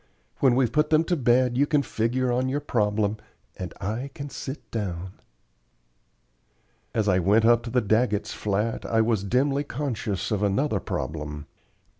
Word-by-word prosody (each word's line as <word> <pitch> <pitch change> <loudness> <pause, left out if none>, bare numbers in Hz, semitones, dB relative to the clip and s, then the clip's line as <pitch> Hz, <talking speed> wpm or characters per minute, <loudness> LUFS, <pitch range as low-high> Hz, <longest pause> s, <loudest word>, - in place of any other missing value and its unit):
When 130 -3 +4
we've 125 -3 +2
put 150 +3 +2
them 155 0 +4
to 175 +1 0
bed 125 -2 +2
you 145 - +4
can 150 -3 +2
figure 125 +2 0
on 130 +2 +1
your 140 +2 0
problem, 105 -6 0 0.4
and 90 -1 -6
I 110 +7 -3
can 140 0 -6
sit 135 +3 -7
down." 95 -5 -3 1.8
As 110 -2 0
I 95 -2 +4
went 105 +5 +3
up 120 0 +5
to - - -4
the 125 0 +1
Daggetts' 110 0 +1
flat 105 +2 -1
I 115 -1 +2
was 110 -3 +1
dimly 135 +7 +1
conscious 115 -8 -3
of 105 -2 0
another 105 +3 +1
problem. 75 -3 -4
115 Hz, 160 wpm, -25 LUFS, 105-130 Hz, 1.8 s, up